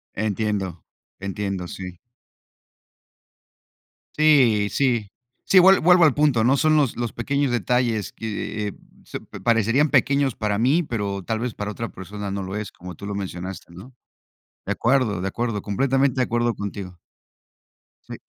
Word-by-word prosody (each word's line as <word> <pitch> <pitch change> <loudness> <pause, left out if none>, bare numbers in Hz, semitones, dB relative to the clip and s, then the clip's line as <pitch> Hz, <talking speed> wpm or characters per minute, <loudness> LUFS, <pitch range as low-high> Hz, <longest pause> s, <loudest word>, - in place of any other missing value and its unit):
Entiendo. 105 -4 -2 0.4
Entiendo, 100 -2 -4
sí. 90 0 -8 2.2
Sí, 130 -9 +4
sí. 120 -6 0 0.4
Sí, 195 - +4
vuel 190 +2 +7
vuelvo 180 +1 +5
al 150 - +4
punto, 145 -6 +2
¿no?, 130 +4 +4
son 155 +2 +3
los 140 -6 +1
los 120 -2 -3
pequeños 140 +3 -1
detalles 120 -3 0
que 105 -1 -4 0.3
se - - -6
parecerían 115 +6 +1
pequeños 140 -1 +2
para 105 -2 -1
mí, 140 +9 +3
pero 100 - -3
tal 110 +3 -2
vez 120 -1 -3
para 105 0 -4
otra 115 +2 -5
persona 100 +2 -7
no 100 0 -3
lo 95 +1 -5
es, 105 -2 -4
como 90 0 -10
tú 100 - -10
lo 100 - -4
mencionaste, 95 -2 -6
¿no? 100 +10 -12 0.7
De - - -1
acuerdo, 120 -6 +1
de 95 - -2
acuerdo, 115 0 -3
completamente 135 +5 +1
de - - +5
acuerdo 120 0 0
contigo. 100 -3 -6 1.1
Sí. - - -5
110 Hz, 150 wpm, -23 LUFS, 100-130 Hz, 2.2 s, vuel